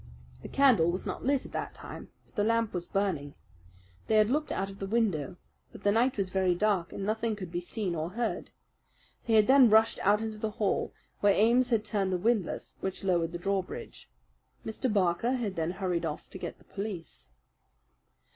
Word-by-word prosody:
The - - -7
candle 255 -12 +4
was 180 +2 -2
not - - -4
lit 275 0 +2
at - - -10
that - - -4
time; - - -9 0.2
but - - -29
the 205 - 0
lamp 230 0 +1
was 175 -1 -3
burning. 175 -8 -1 0.7
They 220 - +2
had 215 +1 +4
looked 300 +2 0
out 195 - -1
of 195 - -13
the 195 - -4
window; 195 -7 0 0.4
but - - -13
the 205 - +4
night 240 +4 +2
was 190 -2 -1
very 185 -2 +2
dark 190 -3 +1
and 195 - -5
nothing 220 +1 0
could 185 -4 -7
be 175 0 -2
seen 185 0 -3
or 160 0 -2
heard. 230 +5 -3 0.8
They 225 - +3
had 215 -1 +6
then 265 -1 +7
rushed 220 +1 +4
out 205 +2 +4
into 220 -1 -5
the 220 - -1
hall, 205 -3 0 0.3
where 205 -1 +4
Ames 240 +4 +4
had 225 -3 +1
turned 200 -3 0
the 185 - +1
windlass 210 -1 -1
which 190 0 -4
lowered 170 -3 +1
the 175 - -4
drawbridge. 190 +1 -4 0.6
Mr. 220 +3 -2
Barker 195 +4 +2
had 225 -7 -2
then 165 0 -1
hurried 180 -2 -2
off 150 - -6
to 190 - -8
get - - -6
the - - -22
police. 195 - -7
205 Hz, 200 wpm, -29 LUFS, 180-225 Hz, 0.8 s, then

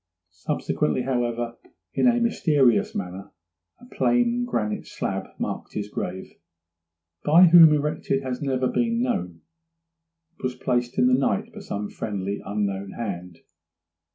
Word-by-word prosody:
Subsequently, 85 +4 -1
however, 120 -2 -2 0.3
in - - +2
a 240 -1 +4
mysterious 150 - +2
manner 95 +1 -6 0.5
a 245 - -15
plain 245 -1 +1
granite 105 - -2
slab - - -4
marked - - -4
his 105 -1 -4
grave; 95 -2 -6 0.8
by 165 +5 +7
whom 165 -2 +9
erected 150 -2 0
has 125 -1 -3
been 140 - -3
never 130 -1 0
known. 230 - -1 1.0
It - - -18
was 125 0 -2
placed 120 -2 -1
in - - +4
the 125 - +3
night 200 - 0
by 215 - -9
some 105 - -4
friendly, 100 -2 -4
unknown 100 -1 -3
hand. 90 -6 -6
125 Hz, 130 wpm, -24 LUFS, 100-165 Hz, 1.0 s, whom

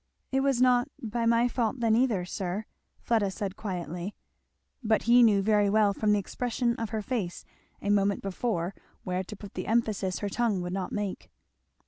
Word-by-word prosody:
"It 270 - +2
was 270 -2 +2
not 250 -1 +4
by 230 +1 -2
my 235 +1 +4
fault 240 0 -1
then 230 -2 +3
either, 225 -7 +2
sir," 190 +3 -3 0.4
Fleda 220 -4 +1
said 190 0 -4
quietly. 180 -1 -5 0.7
But 220 -1 +2
he 240 +1 +6
knew 205 -4 +5
very 210 -1 +3
well 210 -1 +4
from 210 +1 +1
the 210 - +4
expression 235 +4 -1
of 225 -2 -3
her 220 -1 -3
face 200 -7 -3 0.4
a 205 - +1
moment 200 -1 +2
before 195 -2 -2 0.3
where 185 0 -2
to 210 - -9
put 205 0 -11
the 185 - -5
emphasis 215 -5 0
her 205 - -3
tongue 225 -2 0
would 175 0 -4
not 190 -1 -3
make. 205 -2 -4
210 Hz, 180 wpm, -28 LUFS, 195-235 Hz, 0.7 s, he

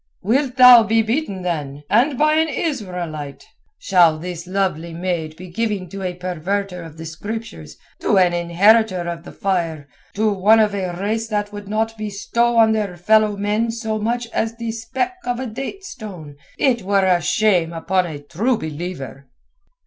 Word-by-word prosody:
"Wilt 255 +5 +1
thou 250 -2 +9
be 225 +1 +2
beaten 220 - -2
then, 150 -5 -3
and 250 - +2
by 305 +2 +3
an 320 +1 +2
Israelite? 180 - -4 0.3
Shall 175 -5 +4
this 175 +1 -7
lovely 180 -4 -2
maid 170 -3 -3
be 185 +3 -10
given 210 -3 -2
to 195 +2 -7
a 180 -1 -3
perverter 180 +1 -3
of 160 -2 -11
the 160 - -8
Scriptures, 165 - -7 0.2
to 200 - +2
an 180 -2 +4
inheritor 185 +4 +3
of 170 -1 -5
the - - -9
fire, 170 -7 -2 0.3
to 215 0 +2
one 205 +4 +4
of 210 -2 +3
a 185 -3 -2
race 220 +3 -1
that 205 -1 -2
would 205 -1 -8
not 220 +1 -2
bestow 230 +3 0
on 220 -1 +6
their 205 -5 -1
fellow 215 +3 +3
men 210 +3 0
so 225 -1 -3
much 240 +3 -1
as 225 +1 -1
the 230 -1 -4
speck 255 +11 -3
out 245 - -1
of 245 - -7
a 260 - -3
date 270 - -6
stone? 180 - -9 0.2
It 250 -4 +2
were 195 0 +2
a 180 -2 +3
shame 180 -1 +2
upon 180 +2 0
a 155 -3 -6
True 215 - 0
Believer." 150 -4 -6
200 Hz, 175 wpm, -20 LUFS, 175-225 Hz, 0.3 s, thou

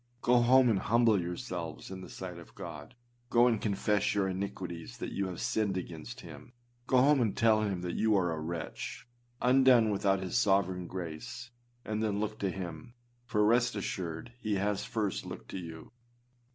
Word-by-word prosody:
Go 120 0 +5
home 130 +2 +6
and 110 -5 +3
humble 115 -2 +3
yourselves 90 -2 -5
in 95 -1 -6
the - - -9
sight 90 -2 -7
of 85 - -15
God: 125 - -8 0.3
go 120 +1 +5
and 115 -4 +2
confess 105 0 +1
your 100 -2 +2
iniquities 95 +1 -5
that - - -5
you 100 -1 -1
have 90 -2 -6
sinned 105 -4 0
against 90 +8 -7
him; 125 - -12 0.3
go 130 - +3
home 140 +1 +5
and 110 -4 0
tell 110 -3 +4
him 100 -4 -1
that 90 -1 -3
you 110 -2 +3
are 90 -3 +1
a 80 - -3
wretch, 85 +7 -5 0.4
undone 125 -3 +6
without 100 -1 +2
his 95 -1 -4
sovereign 95 -5 +2
grace; 105 +9 -6 0.3
and 110 0 -2
then 105 -2 0
look 110 0 -3
to 100 - 0
him, 90 +4 -7 0.3
for 105 -3 +2
rest 120 +2 +3
assured 95 +1 -4
he 110 -4 -1
has 100 +1 0
first 105 -4 -2
looked - - -8
to 95 - -4
you. 80 0 -9
100 Hz, 180 wpm, -31 LUFS, 90-120 Hz, 0.4 s, home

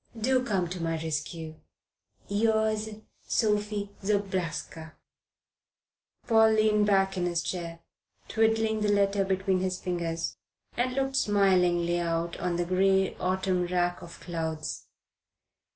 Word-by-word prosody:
Do 255 +3 +2
come 195 -7 0
to 180 -1 -5
my 165 0 -1
rescue. 160 0 -4 0.7
Yours, 220 +1 +1 0.4
SOPHIE 210 -1 0
ZOBRASKA. 185 -6 -2 1.3
Paul 220 -2 +5
leaned 215 -1 +3
back 195 -1 +2
in 175 -1 0
his 170 -1 -1
chair, 170 -2 -5 0.5
twiddling 220 -1 +1
the 210 -1 +2
letter 200 -1 +2
between 190 0 0
his 185 0 -2
fingers, 170 -2 -3 0.4
and 250 +1 0
looked 270 0 0
smilingly 180 -5 +3
out 170 0 -1
on 175 -1 -1
the 175 0 0
grey 190 +1 +2
autumn 185 -1 0
rack 175 0 0
of 170 -1 -11
clouds. 160 -3 -4
190 Hz, 120 wpm, -28 LUFS, 175-210 Hz, 1.3 s, Paul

